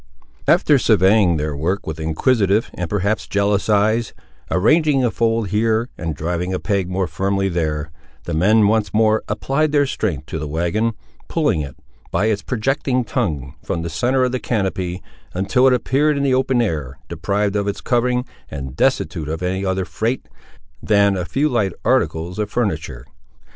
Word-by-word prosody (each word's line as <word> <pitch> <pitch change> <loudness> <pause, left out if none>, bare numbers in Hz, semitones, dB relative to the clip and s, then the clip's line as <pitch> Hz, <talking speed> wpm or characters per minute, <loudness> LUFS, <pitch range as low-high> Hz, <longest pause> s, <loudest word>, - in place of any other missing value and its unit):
After - - +4
surveying 95 -2 +4
their 75 -1 -2
work 90 +8 -2
with 80 0 -5
inquisitive, 100 - +1
and 90 -1 -4
perhaps 105 +1 -1
jealous 100 0 0
eyes, 110 +2 +2 0.4
arranging 145 - +3
a 120 - +1
fold 115 -3 0
here, 110 +3 +1
and 80 -3 -4
driving 90 +4 -2
a - - -2
peg 100 -4 -1
more 95 +1 0
firmly 95 +3 -1
there, 80 -3 -2 0.3
the - - -4
men 105 +6 +4
once 105 -2 +1
more 110 0 +3
applied 135 +8 0
their 145 -1 +3
strength 90 - -2
to 80 - -5
the 75 - -4
wagon, 85 +9 0 0.3
pulling 80 - +1
it, 70 -3 -7 0.3
by 105 - 0
its 105 -2 +1
projecting 130 +1 0
tongue, 80 - -2
from 85 - -3
the 85 - -4
centre 125 +11 +1
of 125 - +1
the 130 - -1
canopy, 95 -6 -2 0.3
until 100 +8 +3
it 130 - +5
appeared 140 +4 +1
in 140 - 0
the 135 -2 +2
open 130 -1 +2
air, 75 - -3
deprived 100 +5 -1
of 100 -1 0
its 100 +1 -2
covering, 125 +2 0 0.2
and 65 -1 -6
destitute 75 +1 0
of 80 +3 -4
any 95 +2 -1
other 95 -1 -1
freight, 115 +7 -2 0.5
than 100 -2 +3
a 90 -2 -2
few 140 +10 0
light 110 - 0
articles 85 +4 0
of 105 -1 -1
furniture. 80 - -2
100 Hz, 170 wpm, -20 LUFS, 85-115 Hz, 0.5 s, it